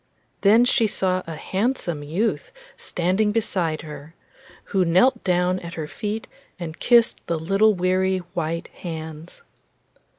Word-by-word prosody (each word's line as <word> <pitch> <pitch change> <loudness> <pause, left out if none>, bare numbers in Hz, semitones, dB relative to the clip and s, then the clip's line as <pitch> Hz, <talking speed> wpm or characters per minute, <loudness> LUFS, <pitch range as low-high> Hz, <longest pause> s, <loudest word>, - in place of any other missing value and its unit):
Then 220 +4 +6
she 230 -2 +3
saw 185 -2 0
a 165 - -5
handsome 190 - -2
youth 195 - -2 0.2
standing 190 +5 0
beside 180 -8 -1
her; 150 +1 -10 0.5
who 190 -2 +1
knelt 190 +9 +3
down 180 0 +1
at 170 -1 -8
her 160 - -3
feet 215 +5 -4 0.3
and 165 -2 -6
kissed 235 -1 +4
the 170 - 0
little 195 +6 +3
weary 185 +1 +1 0.2
white 165 0 -3
hands. 160 - -8
185 Hz, 130 wpm, -23 LUFS, 165-210 Hz, 0.5 s, Then